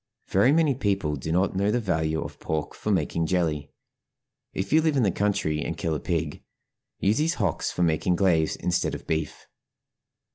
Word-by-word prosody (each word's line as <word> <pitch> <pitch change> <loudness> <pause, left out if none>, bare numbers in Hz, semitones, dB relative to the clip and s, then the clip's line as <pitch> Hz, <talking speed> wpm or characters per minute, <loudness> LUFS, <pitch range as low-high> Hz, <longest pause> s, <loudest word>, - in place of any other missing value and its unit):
Very 100 +8 +4
many 155 -2 +3
people 100 - 0
do 75 +3 -4
not 90 +2 +1
know 100 +2 +1
the 120 - +2
value 80 -7 0
of - - -9
pork 80 -1 -3
for - - -5
making 85 -3 0
jelly. 80 -5 0 0.8
If 95 +7 -3
you 160 - +6
live 155 -3 +1
in 130 - +3
the 100 - +3
country 90 -6 0
and 80 - -4
kill 80 -1 -1
a 75 - -1
pig, 80 -3 -2 0.6
use 105 +6 +1
his 160 +2 +1
hocks 95 -7 -1
for 90 - -1
making 85 +2 +2
glaze 85 -4 +2
instead 90 - -1
of - - -9
beef. 80 -2 -3
90 Hz, 185 wpm, -26 LUFS, 80-105 Hz, 0.8 s, you